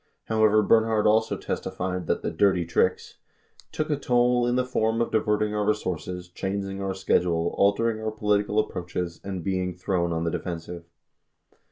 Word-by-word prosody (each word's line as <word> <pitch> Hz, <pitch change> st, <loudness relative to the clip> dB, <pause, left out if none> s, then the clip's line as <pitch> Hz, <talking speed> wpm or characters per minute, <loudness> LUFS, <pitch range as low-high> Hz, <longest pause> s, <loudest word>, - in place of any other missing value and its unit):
91 110 Hz, -, +1 dB
However, 105 Hz, 0 st, +4 dB
Bernhard 110 Hz, 0 st, +3 dB
also 110 Hz, +1 st, +3 dB
testified 90 Hz, -2 st, -4 dB
that -, -, -1 dB
the -, -, -1 dB
"dirty 90 Hz, 0 st, +2 dB
tricks"... 85 Hz, -, 0 dB, 0.5 s
took 155 Hz, 0 st, -2 dB
a -, -, +3 dB
toll 125 Hz, -2 st, +2 dB
in 120 Hz, -, +1 dB
the 125 Hz, 0 st, +1 dB
form 115 Hz, -2 st, 0 dB
of 115 Hz, -, 0 dB
diverting 105 Hz, -1 st, +1 dB
our 105 Hz, 0 st, 0 dB
resources, 90 Hz, -4 st, -2 dB
chang 100 Hz, +2 st, -3 dB
ing 95 Hz, 0 st, -5 dB
our 95 Hz, -1 st, -2 dB
schedules, 85 Hz, -3 st, +1 dB
altering 110 Hz, +3 st, +2 dB
our 110 Hz, -, -1 dB
political 105 Hz, -1 st, 0 dB
approaches, 90 Hz, -4 st, -2 dB
and 95 Hz, -3 st, -5 dB
be 95 Hz, 0 st, 0 dB
ing 90 Hz, -1 st, -3 dB
thrown 90 Hz, -1 st, -1 dB
on 80 Hz, 0 st, -1 dB
the 85 Hz, -, -1 dB
defensive. 85 Hz, 0 st, -5 dB
100 Hz, 175 wpm, -26 LUFS, 90-110 Hz, 0.5 s, However